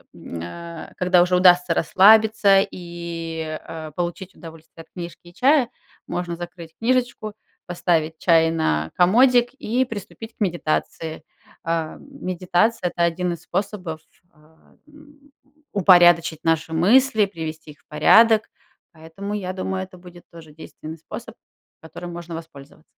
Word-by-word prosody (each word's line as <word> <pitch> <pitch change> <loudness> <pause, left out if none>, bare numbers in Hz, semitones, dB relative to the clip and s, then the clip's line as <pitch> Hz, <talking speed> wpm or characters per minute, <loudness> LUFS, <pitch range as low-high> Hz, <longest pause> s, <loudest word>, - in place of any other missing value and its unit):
э, - - -21
м, 85 - -8
а, 170 - -9
когда 180 -1 +4
уже 180 0 +1
удастся 180 -1 +5
расслабиться 205 +1 +5
и, 165 -2 -6
а, 160 -1 -8
получить 175 +3 -5
удовольствие 165 -1 -13
от - - -39
книжки 175 -1 -8
и 175 - -17
чая, 265 -1 +3 0.4
можно 175 -1 -4
закрыть 170 -1 -10
книжечку, 240 -3 -1 0.3
поставить 165 -2 -1
чай 165 -1 +4
на 80 - -1
комодик 245 +7 +4
и 255 -1 -1
приступить 225 +1 -9
к - - -46
медитации. 160 -3 -2 0.4
А, 165 -1 -2
м 280 -4 -13
медитация- 185 +2 0
это 170 - -2
1 175 +1 -1
из 165 - -11
способов, 180 -4 -4 0.3
а, 155 +1 -26
м, 290 -1 -20 0.4
упорядочить 175 -5 +5
наши 165 0 0
мысли, 220 +5 +4
привести 160 -4 -7
их 145 - -25
в - - -38
порядок, 220 +9 +5 0.4
поэтому, 165 +6 -8
я 185 -3 -3
думаю, 190 0 -3
это 185 0 -15
будет 175 -1 -15
тоже 165 -2 -14
действенный 160 0 -10
способ, 160 - -9 0.5
которым 170 +2 -9
можно 170 -1 -8
воспользова 155 -2 -11
175 Hz, 140 wpm, -22 LUFS, 160-200 Hz, 0.5 s, удастся